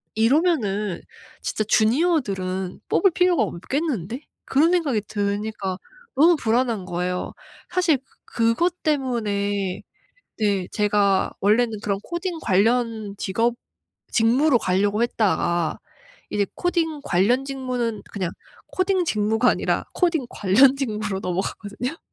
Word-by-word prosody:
'이러면은 220 - +1 0.4
진짜 215 - -1
주니어들은 215 - +1
뽑을 390 -3 +4
필요가 355 -7 +3
없겠는데?' 240 - -3 0.2
그런 310 +5 +3
생각이 300 -11 +1
드니까 205 -2 -2 0.4
너무 325 +6 +6
불안한 230 -5 0
거예요. 180 0 -3 0.4
사실 345 -5 +2
그 265 - -33
그것 240 +11 0
때문에 205 - -1 0.6
네 200 -4 0
제가 205 -2 +2
원래는 215 +1 +2
그런 200 -2 -1
코딩 345 0 -4
관련 220 0 +1
직업 230 +5 0 0.6
직무로 245 +4 +4
가려고 200 +3 +1
했다가 175 -8 0 0.5
이제 205 -1 0
코딩 330 -4 -1
관련 215 +9 +2
직무는 250 -5 -3
그냥 185 -4 -3 0.4
코딩 370 -1 +1
직무가 220 -2 +2
아니라 - - 0
코딩 335 -7 +1
관련 255 +8 +4
직무로 210 -7 -2
넘어가거든요. 205 - -4
225 Hz, 270 characters per minute, -23 LUFS, 200-275 Hz, 0.6 s, 너무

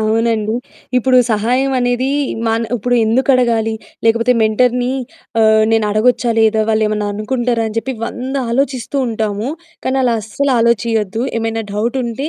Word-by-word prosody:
అవునండి. 220 0 0 0.4
ఇప్పుడు 255 +1 +4
సహాయం 250 +6 +1
అనేది 245 +1 0 0.4
మన 225 +1 +1 0.2
ఉప్పుడెందుకు 245 +3 +1
అడగాలి 230 -3 +1 0.3
లేకపోతే 230 +2 +3
మెంటర్‌ని 245 +3 +2 0.5
ఆహ్, 220 0 +5
నేను 225 -1 +3
అడగొచ్చా 240 +3 +2
లేదా? 220 0 +3
వాళ్ళేమన్నా 215 -1 0
అనుకుంటారా? 235 +2 -1
అని 215 - -8
జెప్పి 265 +2 -3
వంద 260 +2 -5 0.2
ఆలోచిస్తూ 255 0 -1
ఉంటాము. 215 0 -2 0.4
కానీ 265 +1 0
అలా 240 -2 +2
అస్సలు 270 +6 -1
ఆలోచియొద్దు. 230 -1 +1 0.2
ఏమైనా 225 0 -2
డౌటుంటే 240 +5 -2
230 Hz, 125 wpm, -16 LUFS, 220-250 Hz, 0.5 s, ఆహ్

